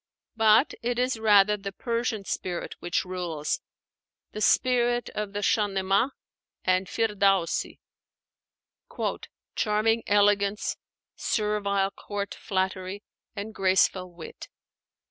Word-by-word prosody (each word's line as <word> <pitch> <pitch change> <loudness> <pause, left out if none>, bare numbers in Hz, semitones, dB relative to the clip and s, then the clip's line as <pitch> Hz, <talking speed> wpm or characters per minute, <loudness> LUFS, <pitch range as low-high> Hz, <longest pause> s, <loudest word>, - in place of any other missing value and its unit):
But 220 +4 +5
it 240 +1 -1
is 250 -2 0
rather 210 -1 +5
the 195 0 -6
Persian 230 -1 -2
spirit 180 -2 -3
which 175 +1 -1
rules, 175 -5 -3 0.7
the 215 - -6
spirit 240 +1 +2
of 210 -1 -4
the 205 - -2
Shahnámeh 200 +2 +2 0.5
and 185 0 +2
Firdaúsi, 200 -5 +1 1.8
"charming 220 +2 +2
elegance, 205 0 +2 0.4
servile 200 -2 0
court 200 0 -5
flattery, 190 0 -3 0.3
and 210 +1 -5
graceful 185 -1 +2
wit." 170 -2 -10
205 Hz, 95 wpm, -27 LUFS, 190-220 Hz, 1.8 s, But